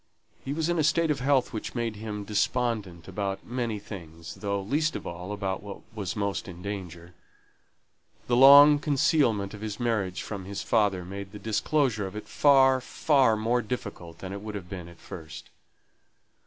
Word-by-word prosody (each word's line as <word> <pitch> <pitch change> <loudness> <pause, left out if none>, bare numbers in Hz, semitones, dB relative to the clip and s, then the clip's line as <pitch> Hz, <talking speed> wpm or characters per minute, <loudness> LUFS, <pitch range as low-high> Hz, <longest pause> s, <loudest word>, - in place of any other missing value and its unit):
He 135 - -4
was 160 +2 -1
in 175 -1 +1
a - - +3
state 155 +2 +2
of 145 - -1
health 135 -1 +2
which 110 - -5
made 115 -3 -2
him 105 -1 -5
despondent 105 -4 -1
about 95 0 -3
many 120 -3 -2
things, 85 -5 -9
though, 100 -1 -2
least 150 +10 0
of - - -5
all, 90 +3 -6
about 95 -2 -3
what 100 -1 -9
was 100 -6 -4
most 100 -6 -2
in 90 -1 -9
danger. 90 -4 -6 1.1
The 120 - +1
long 140 +3 +9
concealment 135 -8 +2
of 105 - -9
his 105 -1 -5
marriage 105 -7 -1
from 100 -3 -6
his 100 +1 -5
father 100 -5 +1
made 100 +2 -7
the - - -7
disclosure 110 +1 0
of 95 - -9
it 105 - -7
far, 135 -2 +5
far 130 -4 +2
more 115 +3 +1
difficult 100 -8 -6
than 95 +1 -7
it 100 - -6
would 105 0 -6
have 90 -2 -8
been 90 -3 -6
at 85 -1 -14
first. 80 -3 -10
105 Hz, 180 wpm, -27 LUFS, 95-125 Hz, 1.1 s, long